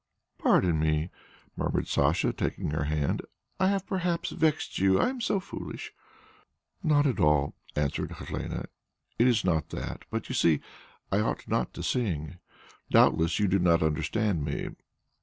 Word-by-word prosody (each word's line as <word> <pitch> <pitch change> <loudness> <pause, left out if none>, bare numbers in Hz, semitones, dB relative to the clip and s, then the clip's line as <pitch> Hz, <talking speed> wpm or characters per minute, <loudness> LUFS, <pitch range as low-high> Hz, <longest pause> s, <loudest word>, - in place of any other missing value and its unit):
"Pardon 85 -4 +3
me," 80 +2 +1 0.4
murmured - - -1
Sacha, 75 +5 +2
taking - - -2
her 75 -1 -1
hand. 75 -1 0 0.4
"I 190 - +4
have 195 -1 +1
perhaps 180 -4 -1
vexed 160 -1 0
you; 95 0 +4
I - - +3
am 260 -1 -5
so 205 -3 +1
foolish." 190 - -7 0.9
"Not 150 -5 +3
at 130 -5 +1
all," 75 -2 +3 0.2
answered 75 -1 -1
Helene. - - -5 0.6
"It 120 - +6
is 115 -5 +2
not 80 -4 +1
that. - - -6
But - - -3
you - - -4
see, 80 -3 +3 0.5
I 100 - +3
ought 105 - -1
not - - 0
to - - -5
sing. 90 -9 -1 0.5
Doubtless, 80 +1 +4
you 105 - +2
do 95 +1 +2
not 85 -2 +4
understand 80 +3 0
me. 70 -1 -3
90 Hz, 155 wpm, -28 LUFS, -, 0.9 s, It